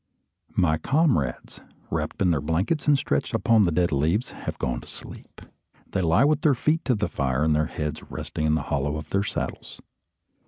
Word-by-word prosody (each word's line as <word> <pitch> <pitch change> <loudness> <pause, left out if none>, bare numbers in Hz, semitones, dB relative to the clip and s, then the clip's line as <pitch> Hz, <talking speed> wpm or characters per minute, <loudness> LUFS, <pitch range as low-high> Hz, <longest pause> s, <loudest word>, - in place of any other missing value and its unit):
My 80 -4 +2
comrades, 135 - 0 0.3
wrapped - - -2
in 90 - +3
their 75 -4 +1
blankets, 90 - -1
and 145 -1 +5
stretched 130 - -1
upon 115 -3 +4
the 85 - +1
dead 85 +1 +1
leaves, 80 - +1
have - - -6
gone - - -2
to - - -14
sleep. - - -12 0.5
They 95 - 0
lie 85 +6 +4
with 150 0 +2
their 145 -4 +4
feet 155 +6 +1
to 125 - +2
the 105 0 -1
fire, 65 +1 -1
and 80 -1 +3
their 75 0 +1
heads 75 -1 -4
resting 80 - -3
in 75 - +3
the 80 - -1
hollow 75 +2 0
of 75 -1 -9
their 100 - +2
saddles. - - -5
85 Hz, 195 wpm, -25 LUFS, 75-115 Hz, 0.5 s, and